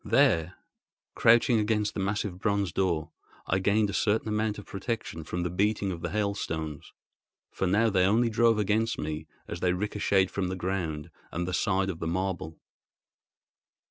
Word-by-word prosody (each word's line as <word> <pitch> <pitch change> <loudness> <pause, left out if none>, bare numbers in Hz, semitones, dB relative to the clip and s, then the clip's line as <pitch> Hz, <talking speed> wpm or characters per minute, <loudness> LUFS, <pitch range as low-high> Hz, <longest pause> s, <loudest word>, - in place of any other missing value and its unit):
There, 85 +2 +3 0.6
crouching 115 0 +5
against 105 -1 0
the - - -4
massive 100 -1 -2
bronze 100 -3 0
door, 85 -4 0 0.3
I 95 - +1
gained 105 +3 +2
a - - -8
certain 110 +1 +1
amount 105 0 0
of 105 - -9
protection 100 -6 -4
from 85 +3 -3
the 90 - -2
beating 100 +1 +1
of 85 -2 -6
the - - -2
hailstones, 80 -7 -3 0.6
for 95 - -1
now 110 +5 +3
they 95 -2 +3
only 115 +4 +3
drove 115 0 +4
against 110 +2 +1
me 75 0 -4 0.2
as 85 - -5
they 90 0 +2
ricocheted 100 0 +1
from 95 -2 -1
the 95 - -3
ground 85 -5 -3 0.2
and 85 +2 -2
the 90 - -3
side 95 0 +1
of 80 - -9
the 80 - -3
marble. 85 -3 -2
95 Hz, 170 wpm, -28 LUFS, 90-105 Hz, 0.6 s, crouching